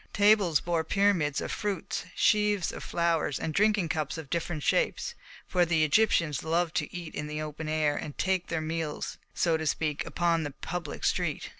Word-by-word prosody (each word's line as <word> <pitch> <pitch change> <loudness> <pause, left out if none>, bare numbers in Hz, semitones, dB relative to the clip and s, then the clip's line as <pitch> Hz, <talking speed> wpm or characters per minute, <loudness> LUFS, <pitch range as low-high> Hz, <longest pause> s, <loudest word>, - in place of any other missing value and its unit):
Tables 205 -6 +4
bore 170 -2 0
pyramids 180 -7 +2
of - - -4
fruits, 200 -7 -3
sheaves 210 -3 +2
of - - -8
flowers 170 -5 0
and 160 - -3
drinking 205 -2 +2
cups 155 0 -2
of 155 -4 -8
different 165 -3 -2
shapes; - - +1 0.3
for 180 -1 +2
the 165 -2 +2
Egyptians 165 -3 +2
love 165 +1 0
to 160 -5 -1
eat 175 -2 -7
in 150 - -4
the 150 0 -4
open 155 0 -5
air, 155 -2 +1
and 145 -1 -6
take 185 -2 0
their 165 -2 -2
meals, 155 -1 -3 0.2
so 165 -2 +2
to 160 0 -3
speak, 150 -1 0
upon 170 -1 +1
the 150 - -3
public 160 +2 -6
street. - - 0
165 Hz, 180 wpm, -29 LUFS, 155-180 Hz, 0.3 s, Tables